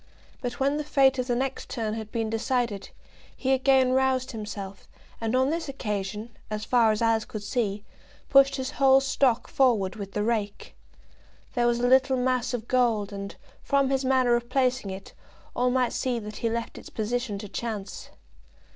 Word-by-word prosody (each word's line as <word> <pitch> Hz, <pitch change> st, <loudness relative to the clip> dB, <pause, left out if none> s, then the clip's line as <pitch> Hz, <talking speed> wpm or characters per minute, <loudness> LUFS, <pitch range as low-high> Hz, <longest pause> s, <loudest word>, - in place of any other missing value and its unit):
But 245 Hz, 0 st, -4 dB
when 280 Hz, +2 st, +1 dB
the 300 Hz, -, -2 dB
fate 270 Hz, -2 st, +3 dB
of 250 Hz, -, -1 dB
the 245 Hz, -, +1 dB
next 265 Hz, +2 st, -3 dB
turn 220 Hz, -4 st, -2 dB
had 220 Hz, -1 st, -6 dB
been 225 Hz, -2 st, -1 dB
decided, 225 Hz, -2 st, -1 dB, 0.5 s
he 265 Hz, -, 0 dB
again 265 Hz, -1 st, +4 dB
roused 260 Hz, 0 st, +1 dB
himself, 205 Hz, -4 st, -7 dB, 0.3 s
and 225 Hz, +2 st, 0 dB
on 260 Hz, +2 st, +3 dB
this 330 Hz, -2 st, -3 dB
occasion, 210 Hz, -3 st, -4 dB
as 215 Hz, 0 st, -4 dB
far 235 Hz, -3 st, +4 dB
as 215 Hz, +2 st, -1 dB
Alice 225 Hz, -1 st, +2 dB
could 215 Hz, -1 st, -7 dB
see, 205 Hz, -2 st, -2 dB, 0.4 s
pushed 275 Hz, 0 st, +5 dB
his 260 Hz, -1 st, -3 dB
whole 270 Hz, -1 st, +5 dB
stock 265 Hz, -3 st, +1 dB
forward 230 Hz, -8 st, +2 dB
with 200 Hz, -2 st, -7 dB
the 210 Hz, -, 0 dB
rake. 210 Hz, -3 st, -2 dB, 0.8 s
There 240 Hz, -2 st, +2 dB
was 240 Hz, 0 st, +1 dB
a 245 Hz, -, +2 dB
little 265 Hz, +1 st, +4 dB
mass 255 Hz, 0 st, 0 dB
of 235 Hz, -2 st, -4 dB
gold, 225 Hz, -5 st, +1 dB
and, 200 Hz, 0 st, -6 dB, 0.3 s
from 275 Hz, -1 st, +1 dB
his 270 Hz, 0 st, +1 dB
manner 255 Hz, -2 st, +3 dB
of 240 Hz, 0 st, -3 dB
placing 255 Hz, -4 st, +1 dB
it, 190 Hz, +1 st, -8 dB, 0.4 s
all 250 Hz, +1 st, +2 dB
might 250 Hz, -1 st, +1 dB
see 250 Hz, -2 st, -1 dB
that 210 Hz, -2 st, -7 dB
he 230 Hz, -, -1 dB
left 230 Hz, 0 st, -4 dB
its -, -, -12 dB
position 225 Hz, 0 st, -2 dB
to 205 Hz, +1 st, -7 dB
chance. 205 Hz, -1 st, -5 dB
240 Hz, 180 wpm, -26 LUFS, 215-260 Hz, 0.8 s, pushed